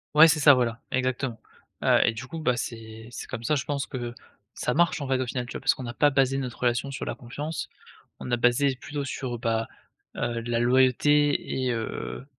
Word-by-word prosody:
Ouais, 160 +2 +9
c'est 155 -1 +2
ça, 145 -1 +8
voilà, 120 -2 0
exactement, 130 -2 -1 0.5
heu - - +5
et 115 - +2
du 120 +4 -7
coup, 165 - -6
bah, 125 -6 +1
c'est 115 -1 -7
c'est - - -7
comme 115 - -6
ça, 150 +6 +1
je 140 - -2
pense 140 -1 -2
que 120 -2 -5 0.4
ça 125 - -1
marche, 170 -2 +2
en 135 - -4
fait, 130 -1 +2
au 130 - 0
final, 125 0 -3
tu - - -10
vois, - - -5
parce 135 - +3
qu'on 130 - -8
n'a 120 -1 -5
pas 145 +3 +4
basé 135 -1 +2
notre 125 -3 -4
relation 125 +3 0
sur 135 - -5
la - - -3
confiance, 145 +6 -5 0.5
on 125 - -5
a 120 - +3
basé 125 +3 +2
plutôt 145 -1 -4
sur, 130 -3 -4
bah, 115 -1 0 0.5
heu, 120 -1 -2
la 115 0 -1
loyauté 130 +4 +3
et - - +1
heu, 115 +3 -5
130 Hz, 225 wpm, -26 LUFS, 120-140 Hz, 0.5 s, Ouais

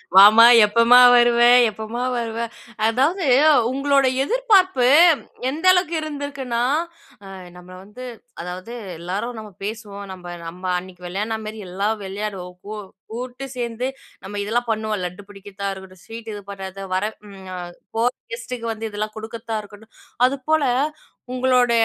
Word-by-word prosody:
வாமா, 210 +4 +9 0.2
எப்பமா 230 +3 +6
வருவ 240 -1 +5 0.3
எப்பமா 220 +3 -5
வருவ. 230 -1 -3 0.5
அதாவது 295 - +1 0.5
உங்களோட 275 0 +2 0.2
எதிர்பார்ப்பு 385 - +3 0.6
எந்த 320 +6 -5
அளவுக்கு 360 -2 +1
இருந்துருக்குனா, 280 -5 -4 0.6
அ, - - -11 0.3
நம்மள 180 +1 -13
வந்து 210 +6 -11 0.4
அதாவது 185 +6 -7 0.3
எல்லாரும் 205 +7 -4
நம்ம 215 -2 -10
பேசுவோம், 205 -2 -6
நம்ப 180 -1 -11 0.2
நம்ப 180 +3 -9
அன்னைக்கு 180 -1 -13
விளையாடுன 210 +5 -3
மேறி 215 0 -7
எல்லாம் 200 +4 -1
விளையாடுவோம். 195 -2 -5
கூ 215 - -6 0.4
கூட்டு 250 +3 -6
சேந்து 240 0 -3 0.4
நம்ம 205 +1 -6
இதெல்லாம் 235 +3 -1
பண்ணுவோம். 215 -1 -2
லட்டு 180 +2 -5
பிடிக்கதா 200 0 -7
இருக்கட்டும், 190 -1 -13
ஸ்வீட் 225 0 -8
இது 205 - -7
பண்ணுறத, 195 -1 -7 0.2
வர 185 - 0 0.9
போற 235 +2 +3 0.2
கெஸ்ட்டுக்கு 230 0 -6
வந்து 220 0 -5
இதெல்லாம் 215 +1 -4
கு 220 - -7
டுக்கர்த்தா 225 0 -5
இருக்கட்டும், 210 +2 -16 0.3
அதுப்போல 280 +4 +1 0.7
உங்களோட 250 -1 +2
225 Hz, 130 wpm, -21 LUFS, 200-250 Hz, 0.9 s, வாமா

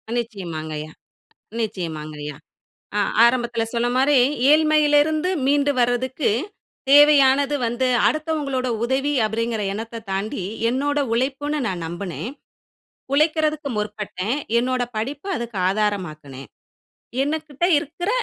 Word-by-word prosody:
நிச்சயமாங்கயா 160 -9 -5 0.7
நிச்சயமாங்கயா! 155 -8 -4 0.6
அ - - +2 0.2
ஆரம்பதல 235 -1 +2
சொன்ன 240 0 0
மாரி 275 +2 +4 0.3
ஏழ்மையில 305 -1 +4
இருந்து 315 +3 -1 0.2
மீண்டு 285 +1 +3
வர்றதுக்கு 245 +3 +1 0.6
தேவையானது 285 -1 +6
வந்து, 240 +3 0 0.2
அடுத்தவங்களோட 300 -5 -1 0.2
உதவி 270 +4 0
அப்படிங்கிற 225 0 -2
எண்ணத்தத் 225 +1 -7
தாண்டி 195 -1 -3 0.3
என்னோட 290 +3 0
உழைப்புன்னு 280 +5 -1
நான் 180 -4 -3
நம்புனேன். 175 +5 -5 0.8
உழைக்கிறதுக்கு 305 0 +1
முற்பட்டேன். 210 +2 -3 0.2
என்னோட 250 +1 0
படிப்ப 275 - -4
அதுக்கு 235 -4 -5
ஆதாரமாக்குனேன். 155 - -3 0.8
எனகிட்ட 310 +1 -2
இருக்குற 325 +6 -4
245 Hz, 95 wpm, -22 LUFS, 205-290 Hz, 0.8 s, தேவையானது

